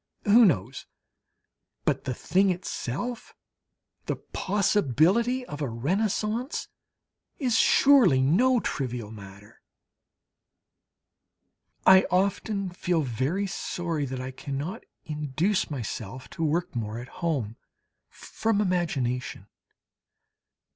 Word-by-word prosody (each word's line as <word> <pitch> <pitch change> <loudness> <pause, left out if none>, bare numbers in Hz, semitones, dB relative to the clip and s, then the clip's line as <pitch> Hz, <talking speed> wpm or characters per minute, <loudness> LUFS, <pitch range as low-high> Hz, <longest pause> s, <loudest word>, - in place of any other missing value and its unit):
Who 225 +3 +7
knows? 130 - 0 1.0
But - - 0
the 130 - -1
thing 190 +9 +2
itself, 185 - -4 0.7
the - - 0
possibility 205 - +1
of 145 -9 -7
a 140 - -1
Renaissance, 210 - -1 0.7
is 250 -6 +1
surely 255 - +5
no 230 - +3
trivial 125 - -4
matter! 100 -1 -13 2.2
I 190 0 +7
often 195 +1 0
feel 175 -2 0
very 135 - -1
sorry 170 -5 -3
that 130 -1 -5
I 130 +1 -5
cannot 145 - -5 0.2
induce 155 +6 -1
myself 125 -2 -6
to 165 - -4
work 160 -1 -1
more 110 -1 -3
at 120 +1 -7
home, 135 -10 -1 0.5
from 220 -2 -2
imagination. 135 - -1
165 Hz, 95 wpm, -27 LUFS, 130-200 Hz, 2.2 s, Who